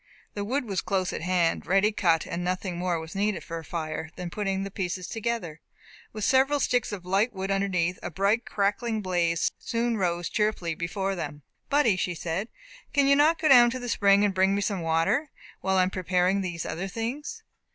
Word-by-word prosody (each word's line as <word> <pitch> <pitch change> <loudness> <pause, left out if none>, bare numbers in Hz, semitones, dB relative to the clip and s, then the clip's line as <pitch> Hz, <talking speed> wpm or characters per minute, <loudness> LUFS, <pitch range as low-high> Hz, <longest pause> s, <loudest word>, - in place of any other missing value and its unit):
The 205 - -3
wood 255 +6 -1
was 195 -4 -2
close 190 -2 -1
at - - -4
hand, 175 -1 +1
ready 195 +4 +3
cut, 170 -6 +2
and 170 +1 -4
nothing 185 0 -2
more 175 -1 -1
was 160 0 -8
needed 205 -1 -1
for 165 -1 -5
a - - -10
fire 155 -1 -4
than 180 -2 -6
putting 195 -1 -1
the 195 - -6
pieces 185 -2 -3
together, 225 -9 -3 0.5
with 215 -1 -6
several 270 +5 +3
sticks 245 -3 +1
of 190 -4 -6
light 200 +6 +1
wood 190 0 -3
underneath; 185 -3 0
a - - -4
bright 200 +7 +1
cracking 215 +2 -1
blaze 170 -3 +1
soon 235 0 -1
rose 175 -3 0
cheerfully 210 -6 0
before 190 +4 -2
them. 150 -5 -6 0.3
"Buddy," 280 -9 +3
she 180 -1 -1
said, 170 +6 -3 0.5
"can 280 -1 +4
you 280 - +6
not 305 +3 +4
go 315 - +1
down 245 -4 +8
to 245 - -3
the 245 -1 -6
spring, 200 -3 +4
and 200 - +1
bring 190 +1 +3
me 200 - 0
some 200 -3 -1
water, 165 - +1 0.3
while 190 0 0
I 185 - +5
am 185 - -1
preparing 185 +1 +1
these 175 -3 -4
other 185 +4 -3
things?" 270 - -5
195 Hz, 205 wpm, -27 LUFS, 175-220 Hz, 0.5 s, down